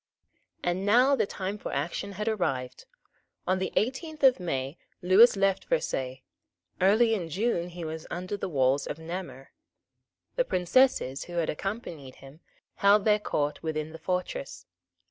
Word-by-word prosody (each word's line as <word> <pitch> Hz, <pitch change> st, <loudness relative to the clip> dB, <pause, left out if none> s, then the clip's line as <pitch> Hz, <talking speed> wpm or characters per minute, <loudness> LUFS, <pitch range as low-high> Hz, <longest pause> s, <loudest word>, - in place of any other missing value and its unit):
And 175 Hz, +2 st, -1 dB
now 245 Hz, +7 st, +5 dB
the 230 Hz, -, 0 dB
time 195 Hz, +2 st, -4 dB
for -, -, -5 dB
action 200 Hz, +3 st, -3 dB
had 210 Hz, +3 st, -4 dB
arrived. 135 Hz, -, -2 dB, 0.6 s
On 185 Hz, +1 st, +1 dB
the 190 Hz, -, -2 dB
eighteenth 290 Hz, +6 st, -2 dB
of 260 Hz, -5 st, +6 dB
May 135 Hz, -4 st, -3 dB, 0.2 s
Lewis 195 Hz, +7 st, +7 dB
left 195 Hz, -1 st, +1 dB
Versailles; 130 Hz, -, -2 dB, 0.6 s
early 220 Hz, +5 st, +4 dB
in 180 Hz, -6 st, -2 dB
June 180 Hz, -1 st, -1 dB
he 175 Hz, -1 st, -7 dB
was 160 Hz, 0 st, -6 dB
under 185 Hz, +3 st, -4 dB
the 195 Hz, -1 st, -4 dB
walls 135 Hz, -2 st, +1 dB
of -, -, -4 dB
Namur. 160 Hz, -5 st, -7 dB, 0.9 s
The -, -, +4 dB
Princesses, 180 Hz, -, +2 dB
who 175 Hz, -, -10 dB
had 170 Hz, -2 st, 0 dB
accompanied 165 Hz, -, -6 dB
him, 135 Hz, +3 st, -15 dB, 0.4 s
held 200 Hz, +1 st, +4 dB
their 210 Hz, -1 st, +4 dB
court 150 Hz, -7 st, -2 dB
within 155 Hz, -1 st, -3 dB
the 160 Hz, -, -10 dB
fortress. 180 Hz, -, -4 dB
180 Hz, 150 wpm, -28 LUFS, 155-210 Hz, 0.9 s, Lewis